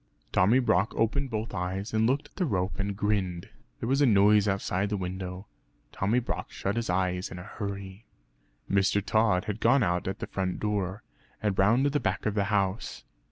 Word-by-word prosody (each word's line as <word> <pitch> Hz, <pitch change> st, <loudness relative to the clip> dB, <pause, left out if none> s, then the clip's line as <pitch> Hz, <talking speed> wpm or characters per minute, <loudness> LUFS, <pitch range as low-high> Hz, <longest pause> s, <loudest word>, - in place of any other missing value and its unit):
Tommy 105 Hz, +7 st, +4 dB
Brock 110 Hz, -5 st, +2 dB
opened 135 Hz, +5 st, 0 dB
both 110 Hz, -1 st, -3 dB
eyes, 95 Hz, +3 st, -3 dB
and 110 Hz, 0 st, +3 dB
looked 135 Hz, +4 st, 0 dB
at -, -, -36 dB
the 185 Hz, -, +1 dB
rope 95 Hz, -5 st, -1 dB
and 100 Hz, 0 st, -2 dB
grinned. 95 Hz, -4 st, -1 dB, 0.3 s
There -, -, -3 dB
was 135 Hz, +3 st, +2 dB
a 140 Hz, -, +5 dB
noise 105 Hz, -1 st, +5 dB
outside 95 Hz, 0 st, 0 dB
the 105 Hz, -, -1 dB
window. 90 Hz, +1 st, -5 dB, 0.5 s
Tommy 105 Hz, +6 st, 0 dB
Brock 125 Hz, -, -2 dB
shut 100 Hz, +2 st, -3 dB
his 115 Hz, -3 st, -2 dB
eyes 90 Hz, 0 st, 0 dB
in 90 Hz, -, -8 dB
a 90 Hz, -, -7 dB
hurry. 100 Hz, 0 st, -7 dB, 0.6 s
Mr. 100 Hz, +1 st, +2 dB
Tod 110 Hz, -4 st, +2 dB
had 105 Hz, 0 st, -3 dB
gone 125 Hz, +4 st, +4 dB
out 90 Hz, 0 st, 0 dB
at 95 Hz, -, -2 dB
the -, -, -4 dB
front 95 Hz, -2 st, -3 dB
door, 105 Hz, -1 st, -2 dB, 0.4 s
and 105 Hz, -2 st, 0 dB
round 115 Hz, +8 st, +4 dB
to 145 Hz, -, +2 dB
the 145 Hz, -, +1 dB
back 95 Hz, -6 st, -2 dB
of 105 Hz, -, +1 dB
the 100 Hz, -1 st, +1 dB
house. 100 Hz, 0 st, -1 dB
100 Hz, 200 wpm, -28 LUFS, 95-110 Hz, 0.6 s, a